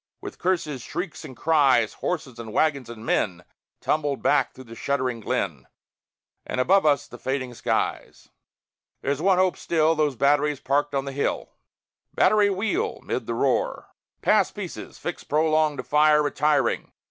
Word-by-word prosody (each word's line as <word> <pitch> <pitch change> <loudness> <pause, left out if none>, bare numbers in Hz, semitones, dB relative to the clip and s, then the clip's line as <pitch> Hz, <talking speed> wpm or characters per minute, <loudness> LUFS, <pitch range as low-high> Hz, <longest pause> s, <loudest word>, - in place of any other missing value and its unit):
With - - -9
curses, 160 -7 -1
shrieks, 175 +6 -5
and 130 - -10
cries, 135 -7 +3
Horses 140 -9 -4
and 115 -2 -7
wagons 140 -2 +1
and 115 -1 -9
men 90 -6 0 0.4
Tumbled 145 -3 -1
back 145 - +3
through 130 - -12
the 115 -2 -12
shuddering 130 -1 -1
glen, 110 - -3 0.8
And - - -4
above 185 +5 +4
us 145 -2 +3
the 120 - -12
fading 130 0 -3
skies. - - -2 0.7
There's 140 +2 -1
one 190 +1 +4
hope, 185 -1 +2
still, 160 -1 +2
Those 150 -3 0
batteries 145 +2 +2
parked 145 +1 0
on 135 0 0
the 140 - -4
hill! 140 +1 -2 0.6
"Battery, 205 +1 +4
wheel!" 225 - -1
('mid - - -3
the - - -2
roar), - - 0 0.3
"Pass 210 -3 +4
pieces; 200 -5 -8
fix 175 - -5
prolonge 155 -1 +2
to 125 - -4
fire 150 +3 +4
Retiring. 145 0 +1
145 Hz, 155 wpm, -25 LUFS, 130-165 Hz, 0.8 s, above